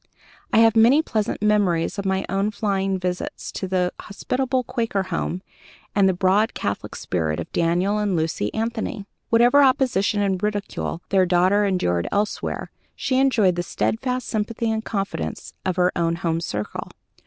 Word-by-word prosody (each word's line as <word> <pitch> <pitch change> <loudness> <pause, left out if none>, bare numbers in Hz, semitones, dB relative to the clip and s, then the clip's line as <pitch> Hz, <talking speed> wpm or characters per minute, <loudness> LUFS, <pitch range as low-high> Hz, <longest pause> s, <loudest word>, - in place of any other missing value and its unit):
I - - +3
have 225 -1 +5
many 245 +8 +6
pleasant 215 -6 -2
memories 200 -4 +2
of 195 - -2
my 190 0 0
own 195 +2 0
flying 195 -2 -1
visits 180 -1 -4
to 190 - -4
that 180 -1 0
hospitable 255 +5 -2
Quaker 230 -5 -1
home 185 0 -3 0.5
and 195 -1 +4
the - - +2
broad 195 +5 +2
catholic 100 0 -3
spirit 80 -3 -2
of 85 - -6
Daniel 180 +5 +1
and 205 -3 0
Lucy 160 -10 -1
Anthony. 225 -2 -3 0.2
Whatever 240 +5 +5
opposition 255 -7 +2
and 190 -2 0
ridicule 205 -4 -3
their 190 -2 +3
daughter 185 +4 +3
endured 90 - 0
elsewhere, 205 +1 -2 0.2
she 260 -1 0
enjoyed 235 -9 +3
the - - +1
steadfast 250 +7 -2
sympathy 225 +1 -1
and 220 0 -2
confidence 195 - -4
of 185 - 0
her 180 0 +3
own 170 -1 +1
home 165 -1 -1
circle. 105 -9 -4
200 Hz, 155 wpm, -23 LUFS, 180-225 Hz, 0.5 s, many